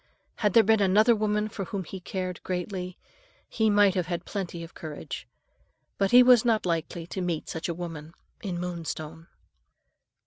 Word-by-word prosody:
Had 210 -3 +1
there 230 - +7
been 220 0 +4
another 215 +5 +5
woman 210 0 0
for 200 -2 -5
whom 195 +2 -4
he 190 +3 -8
cared 185 0 -4
greatly, 180 0 -4 0.5
he 220 -1 +1
might 205 -2 +5
have 180 -2 -1
had 175 -1 -3
plenty 180 -4 -4
of 165 - -11
courage; 155 -2 -7 0.7
but 195 -1 +3
he 250 +3 +8
was 245 -2 +7
not 225 -4 +2
likely 165 -1 -2
to 185 +2 -5
meet 175 -3 -2
such 160 +1 -4
a - - 0
woman 165 -2 -7 0.3
in 180 -4 -3
Moonstone. 165 -2 -5
185 Hz, 170 wpm, -27 LUFS, 170-210 Hz, 0.7 s, he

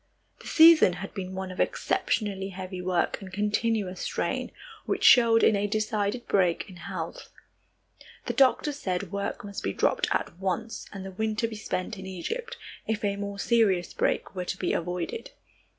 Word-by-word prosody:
The - - -12
season 320 - +7
had 190 +2 -7
been 185 -1 -5
one 190 0 -4
of 185 - -9
exceptionally 195 -3 0
heavy 185 -1 -6
work 180 +1 0
and 190 -1 -9
continuous 210 -1 0
strain, - - -2 0.4
which - - -1
showed 230 -3 +7
in 215 - +5
a 200 +1 0
decided 215 +2 -1
break 180 -4 +2
in 185 - -12
health. - - -6 1.0
The - - -2
doctors 275 +2 +3
said 185 -3 -2
work 200 0 -3
must 200 -1 -6
be 100 - -2
dropped - - +1
at 170 - -1
once 195 +4 -3
and 195 -2 -7
the 190 - -6
winter 220 +3 -1
be 225 - -7
spent 210 -1 -4
in 190 - -7
Egypt, 455 - -5 0.3
if 220 -1 -1
a 200 -1 0
more 200 0 -5
serious 200 -5 +2
break - - 0
were 180 -2 -4
to 185 - -3
be - - -1
avoided. 180 - -3
200 Hz, 170 wpm, -27 LUFS, 185-220 Hz, 1.0 s, season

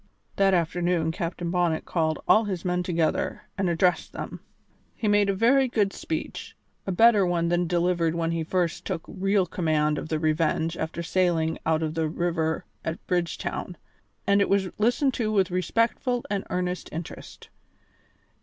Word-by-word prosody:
That 195 -1 +4
afternoon 170 -1 +1
Captain 170 0 -3
Bonnet 175 -3 +1
called 160 -2 0
all 220 +1 +5
his 190 -4 -4
men 180 0 +1
together 170 -3 -1
and 190 -2 0
addressed 175 +1 +1
them. - - -6 0.6
He 220 - -2
made 205 -1 +3
a 195 - +1
very 260 +6 +4
good 210 -5 +1
speech, 160 - -5 0.3
a - - 0
better 220 +2 +5
one 170 -2 +1
than 175 0 +2
that 175 - -1
delivered 170 -1 +1
when 165 -1 0
he 165 -1 -1
first 175 0 -1
took 160 - -3
real 195 0 +1
command 155 -3 0
of - - -7
the 155 - 0
Revenge 160 +1 0
after 160 +1 -4
sailing 170 -2 +1
out 160 0 +2
of 155 -1 -2
the 160 -1 0
river 165 -1 -1 0.2
at 160 - -5
Bridgetown, 175 0 -2 0.5
and 200 +1 +4
it - - +2
was 195 -1 +2
listened 245 +5 +2
to 220 -3 -1
with 195 -4 +2
respectful 230 +6 0
and 200 -1 -1
earnest 180 0 -2
interest. 165 +1 -8
175 Hz, 165 wpm, -26 LUFS, 165-195 Hz, 0.6 s, all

